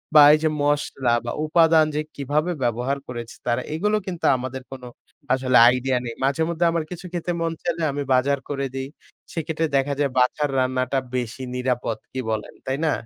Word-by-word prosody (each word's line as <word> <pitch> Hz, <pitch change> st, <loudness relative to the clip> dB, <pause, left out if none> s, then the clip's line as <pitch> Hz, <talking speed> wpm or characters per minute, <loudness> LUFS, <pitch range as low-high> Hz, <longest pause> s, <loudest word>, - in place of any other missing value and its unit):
বা 150 Hz, -, +10 dB
এই 155 Hz, -, +4 dB
যে 155 Hz, -, +3 dB
মসলা 145 Hz, -4 st, +1 dB
বা 120 Hz, -, -2 dB
উপাদান 160 Hz, 0 st, +5 dB
যে 150 Hz, -, +1 dB
কিভাবে 150 Hz, +5 st, 0 dB
ব্যবহার 120 Hz, +4 st, 0 dB
করেছে 120 Hz, -2 st, -7 dB
তারা 120 Hz, -1 st, +1 dB
এগুলো 210 Hz, +6 st, +1 dB
কিন্তু 175 Hz, -3 st, -4 dB
আমাদের 130 Hz, +1 st, -5 dB
কোন 130 Hz, -1 st, -8 dB, 0.5 s
আসলে 130 Hz, -1 st, +3 dB
আইডিয়া 125 Hz, +1 st, +1 dB
নেই। 115 Hz, -1 st, -5 dB
মাঝেমধ্যে 160 Hz, +5 st, +1 dB
আমার 165 Hz, -1 st, 0 dB
কিছু 180 Hz, +1 st, -7 dB
খেতে 175 Hz, 0 st, -2 dB
মন 165 Hz, 0 st, 0 dB
চাইলে 170 Hz, -1 st, -2 dB
আমি 145 Hz, +1 st, -3 dB
বাজার 135 Hz, +2 st, +2 dB
করে 140 Hz, -1 st, -2 dB
দেই। 135 Hz, 0 st, -4 dB, 0.4 s
সেক্ষেত্রে 160 Hz, 0 st, -1 dB
দেখা 140 Hz, +1 st, 0 dB
যায় 140 Hz, -2 st, +1 dB
বাসার 145 Hz, +4 st, +2 dB
রান্নাটা 130 Hz, +1 st, 0 dB, 0.2 s
বেশি 125 Hz, +1 st, -3 dB
নিরাপদ। 125 Hz, -3 st, -1 dB, 0.2 s
কি 130 Hz, -, -3 dB
বলেন, 110 Hz, -1 st, -3 dB
তাই 130 Hz, +1 st, -1 dB
না? 155 Hz, -, +3 dB
140 Hz, 180 wpm, -23 LUFS, 125-160 Hz, 0.5 s, বা